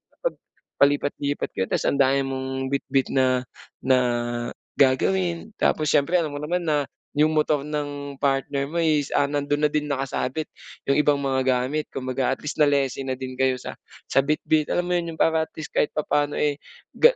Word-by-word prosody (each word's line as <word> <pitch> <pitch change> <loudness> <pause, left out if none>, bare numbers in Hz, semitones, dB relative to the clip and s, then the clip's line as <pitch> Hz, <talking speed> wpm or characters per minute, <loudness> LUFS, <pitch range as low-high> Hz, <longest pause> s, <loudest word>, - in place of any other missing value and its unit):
kapag - - -2 0.4
palipat-lipat 145 0 +1
ka 95 - -2
tapos - - -1
ang 140 - +1
dami 135 0 +4
mong 130 0 -3
bitbit 135 -1 0
na, 130 -1 +2 0.4
na 130 0 +4 0.8
gagawin 170 +8 +2
tapos 155 -1 +2
siyempre 155 +5 +2
alam 155 -3 -2
mo - - -4
naman 175 +4 -1
na 150 -2 +2 0.3
'yung 155 +2 +4
motor 150 -2 +1
ng 145 -2 -5
partner 140 0 0
mo, 160 - -9
is, 155 -4 +2
ah, 145 - +4
nando'n 145 +1 -1
na - - -8
din 150 -1 0
nakasabit 135 +2 -2 0.3
'yung 140 +2 +2
ibang 150 -1 +4
mga 135 -2 -1 0.2
gamit 150 +4 -2
kumbaga 130 0 -1
at - - -20
least 150 +2 -4
na-lessen 140 -2 +2
na 130 - -1
din 130 0 -7
kayo 130 -1 +3
sa 125 - -7 0.4
sa - - +4
bitbit, 150 +2 +1
alam 175 - 0
mo 180 - -4
'yun, 170 -1 -5
'yung - - -20
para 160 -1 +2
at - - -42
least 155 - -7
kahit - - 0
papaano, 145 -1 0
eh, 145 -1 0 0.3
ga 480 +1 +5
145 Hz, 185 wpm, -24 LUFS, 135-150 Hz, 0.8 s, ga